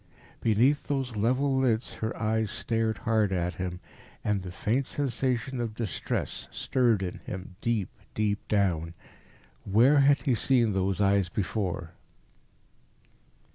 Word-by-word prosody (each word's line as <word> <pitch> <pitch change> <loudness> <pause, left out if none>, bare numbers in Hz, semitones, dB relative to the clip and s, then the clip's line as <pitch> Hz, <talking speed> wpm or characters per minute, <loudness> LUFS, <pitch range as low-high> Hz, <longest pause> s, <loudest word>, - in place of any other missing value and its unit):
Beneath 125 +7 +2
those 135 -5 -2
level 130 +6 +2
lids 120 -3 +1
her 110 +1 -2
eyes 110 -1 0
stared 115 0 -1
hard 110 -4 +1
at 90 -1 0
him. 90 -1 -3 0.4
And 100 -3 0
a 90 - -6
faint 115 +9 0
sensation 130 -1 -1
of 115 -2 -3
distress 110 -8 -3
stirred 120 -6 +1
in 90 - -4
him 95 -2 -7
deep, 115 -5 0 0.3
deep 105 -1 -1
down. 85 -5 +1 0.7
Where 120 +9 +5
had 140 +1 +4
he 130 - +2
seen 120 -1 +2
those 95 0 0
eyes 100 -2 +3
before? 90 -4 -2
110 Hz, 130 wpm, -28 LUFS, 95-125 Hz, 0.7 s, Where